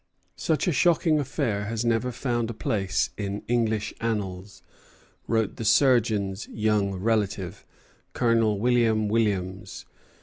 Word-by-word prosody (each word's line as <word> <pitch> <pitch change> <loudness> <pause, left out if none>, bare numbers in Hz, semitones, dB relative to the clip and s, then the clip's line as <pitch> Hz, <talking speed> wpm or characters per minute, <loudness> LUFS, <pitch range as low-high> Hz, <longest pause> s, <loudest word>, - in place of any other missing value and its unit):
"Such 160 +3 0
a - - +3
shocking 165 0 +3
affair 125 -7 -2
has 115 +2 -3
never 115 +2 +1
found 120 -2 -2
a 115 - -5
place 95 -5 -1
in 100 0 -4
English 110 -3 0
annals," 100 -4 -4 0.6
wrote 110 -3 0
the - - -4
surgeon's 110 -4 +2
young 105 -3 0
relative, 100 -2 -1 0.5
Colonel 115 -3 +2
William 115 -2 +2
Williams. 100 -4 -1
110 Hz, 115 wpm, -26 LUFS, 100-120 Hz, 0.6 s, a